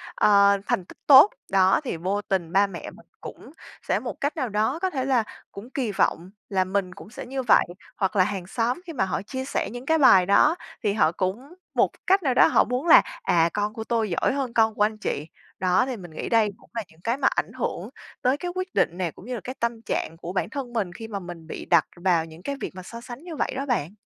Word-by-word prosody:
ờ, 200 -1 +5
thành 180 - 0
tích - - -15
tốt, 285 +8 +9 0.2
đó, 190 +3 +4
thì 245 - -3
vô 190 +5 -1
tình 185 -5 -2
ba 200 +1 +4
mẹ 175 -3 -7
mình - - -17 0.2
cũng - - -10 0.4
sẽ - - +1
một - - -7
cách 285 +3 -1
nào 255 -5 -1
đó 215 +9 0
có 375 - +1
thể 265 -6 -2
là 255 -4 +2 0.3
cũng 205 +5 -10
kỳ 255 -5 -2
vọng 180 -2 0 0.2
là 190 -2 +2
mình 185 -1 -2
cũng 200 - -12
sẽ 225 - -8
như 265 0 -4
vậy. 240 - +5 0.3
Hoặc 195 +1 -1
là 185 - +5
hàng 190 -2 -4
xóm 240 - -1
khi 330 - -6
mà 190 -8 0
họ 170 -5 -2
chia 260 +6 -5
sẻ 275 - -2
những 245 +4 -8
cái 320 +1 +3
bài 190 -10 +6
đó, 295 - +4 0.3
thì 205 -2 +1
họ 160 -6 +3
cũng 210 - -3 0.2
một - - +2
cái - - -24
cách 385 -1 +4
nào 265 - +2
đó - - +6
họ - - +4
muốn 250 +7 -3
là, - - +9 0.2
à, 170 -1 +3
"Con 210 +1 -1
của 220 - -5
tôi 225 -2 -1
giỏi 170 - 0
hơn 270 -4 -3
con 220 -1 +3
của - - -4
anh 215 +1 0
chị." 150 -7 -3 0.3
Đó, 185 +6 +3
thì 255 -3 -4
mình 175 -4 -11
nghĩ 155 - -5
đây 225 -3 +3
cũng - - -22
là 230 - -3
những 160 +1 -23
cái 235 +3 0
mà - - +2
ảnh - - -1
hưởng - - -4 0.3
tới 255 +3 +2
cái 355 +1 -4
quyết 370 0 -4
định 175 - +1
nè, 175 -4 -2
cũng - - -15
như 250 - -5
là 220 - -6
cái 255 +1 -6
tâm 235 -1 -2
trạng 165 -6 -3
của 175 +2 -7
bản 190 - -1
thân 265 -5 -6
mình 195 -6 -2
khi 225 +3 -8
mà 205 -3 -4
mình 175 -3 -10
bị - - -7
đặt - - +4
vào 175 -2 +1
những 165 +2 -14
cái 280 - -3
việc - - -4
mà 185 - -8
so 230 +5 -9
sánh 245 +5 -10
như 340 -3 -7
vậy - - -1
đó 275 - -3
bạn. 205 - -1
215 Hz, 265 wpm, -25 LUFS, 185-255 Hz, 0.4 s, tốt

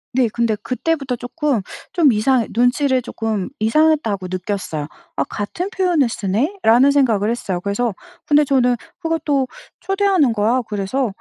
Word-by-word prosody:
네. 255 -2 +3
근데 230 -2 0
그때부터 265 +4 -2
쪼끔 250 - -1 0.3
좀 310 -7 +4
이상해 235 +2 +2
눈치를 255 +3 +2
쪼끔 225 -3 -3
이상했다고 225 -5 +2
느꼈어요. 185 -4 -3 0.3
'아 - - +1
같은 335 - -4
표현을 355 - +2
쓰네?'라는 240 - +2
생각을 230 -7 +2
했어요. 195 -6 -3
그래서 205 +2 -1 0.3
근데 295 -1 +4
저는 250 -3 +3 0.3
그것도 300 -5 0 0.3
"초대하는 390 - +2
거야." 225 +4 +1
그래서 210 +6 -1
250 Hz, 330 characters per minute, -19 LUFS, 215-295 Hz, 0.3 s, 좀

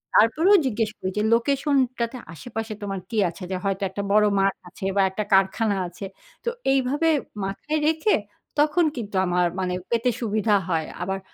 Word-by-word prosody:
তারপরেও 320 - +5
জিজ্ঞেস 225 -3 0
করি 185 - -3
যে 210 - +2
লোকেশনটাতে 255 -1 +1 0.2
আশেপাশে 225 +4 -5
তোমার 195 -1 -3
কী 225 - -3
আছে? 170 - -10
যে - - 0
হয়তো 195 0 -1
একটা 200 +1 -4
বড় 210 +1 +5
মাঠ 195 0 +3 0.2
আছে 190 +1 -8
বা - - +5
একটা 190 +3 -3
কারখানা 195 +2 +3
আছে। 180 +3 -8 0.4
তো - - 0 0.2
এইভাবে 275 +5 +2 0.4
মাথায় 300 +11 -2
রেখে 320 +6 +2 0.5
তখন 310 +3 +2
কিন্তু 210 -4 -5
আমার 180 0 +2
মানে, 180 -1 -1 0.2
পেতে 235 +1 +2
সুবিধা 215 -1 +2
হয়। 160 -3 0
আবার 190 +2 -2
215 Hz, 165 wpm, -24 LUFS, 195-260 Hz, 0.5 s, তারপরেও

